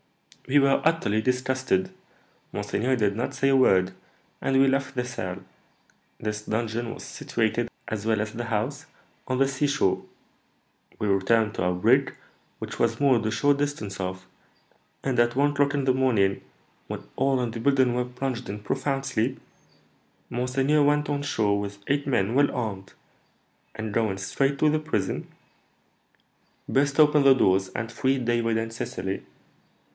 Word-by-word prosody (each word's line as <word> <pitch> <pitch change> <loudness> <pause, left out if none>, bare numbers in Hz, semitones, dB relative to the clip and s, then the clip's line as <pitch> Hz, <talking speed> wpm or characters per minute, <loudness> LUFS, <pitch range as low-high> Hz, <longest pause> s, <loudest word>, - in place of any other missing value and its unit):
"We 135 +2 +3
were 135 0 +3
utterly 155 -10 +2
disgusted. 130 -5 0 0.6
Monseigneur 125 +5 -1
did 105 -3 +1
not 125 +4 -3
say 135 +1 +2
a 135 - +4
word, 95 -8 +4 0.5
and 135 0 +2
we 135 - +5
left 135 0 0
the 125 -1 -1
cell. 95 -7 -5 0.8
This 105 -1 -3
dungeon 115 +2 -2
was - - -10
situated, 115 +1 -2 0.2
as 110 -1 -4
well 110 -1 +2
as 110 0 -3
the 120 +1 -4
house, 125 +8 -2 0.4
on 130 - 0
the 135 +1 +3
seashore. 135 -6 0 0.9
We 105 - -2
returned 105 +2 +2
to - - -2
our 90 0 +1
brig, 120 +10 +2 0.4
which - - -7
was 115 0 +1
moored 130 -6 +3
a - - 0
short 145 +4 +2
distance 110 -10 -3
off, 95 0 -4 0.8
and 130 -3 0
at 120 0 +3
one 145 +2 +3
o'clock 145 0 +1
in 140 -2 0
the 130 - +4
morning, 115 -7 +2 0.5
when - - -6
all 135 -1 +2
in 120 -2 -1
the 115 - -6
building 130 -1 +3
were 125 0 0
plunged 125 0 -4
in 105 +1 -4
profound 135 +5 -2
sleep, 130 0 -1 0.9
monseigneur 135 +4 +1
went 150 +1 +2
on 145 -1 -1
shore 105 -8 +1
with 100 0 -5
eight 145 +1 0
men 115 -5 +1
well 140 +2 +3
armed, 100 -6 -4 0.8
and, 110 -1 -5
going 110 -4 0
straight 135 +9 0
to 155 - +4
the 155 +1 +1
prison, 155 -10 -2 1.4
burst 140 +2 +1
open 150 -1 +6
the 135 -1 +7
doors, 95 -5 +2
and 110 +3 -5
freed 130 +1 0
David 115 -1 +1
and 115 0 -3
Cecily. 95 -3 -4
125 Hz, 160 wpm, -26 LUFS, 110-135 Hz, 1.4 s, the